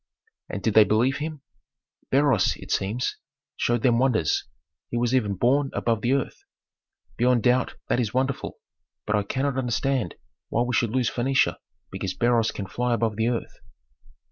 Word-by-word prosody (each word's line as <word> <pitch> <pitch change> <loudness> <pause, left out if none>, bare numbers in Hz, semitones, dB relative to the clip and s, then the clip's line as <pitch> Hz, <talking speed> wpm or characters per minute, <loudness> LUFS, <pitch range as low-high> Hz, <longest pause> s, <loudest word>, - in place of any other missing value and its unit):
"And - - -5
did 110 - +1
they 110 - +8
believe 115 +7 +2
him?" 150 -1 -5 0.7
"Beroes, 135 -7 +3
it - - -10
seems, 105 +6 -1 0.4
showed 120 -1 0
them 120 -2 +4
wonders. 120 - +1 0.4
He 120 - -2
was 120 +1 +1
even 105 -6 +1
borne 135 +7 +2
above 115 -2 0
the 120 +3 +2
earth. 140 -1 -2 0.7
Beyond 125 -1 +3
doubt 125 0 +2
that - - +1
is 115 -4 0
wonderful; 130 +2 -2 0.5
but 105 - +1
I 105 - +2
cannot 130 +6 -1
understand 130 0 -1 0.3
why 120 - +1
we 125 0 -2
should 115 0 +2
lose 125 0 0
Phœnicia 135 +2 +1 0.3
because 95 -1 -4
Beroes 120 -1 +2
can 100 - -5
fly 120 +5 -1
above 115 -2 -1
the 110 +2 0
earth." 120 -1 -3
120 Hz, 165 wpm, -25 LUFS, 110-130 Hz, 0.7 s, they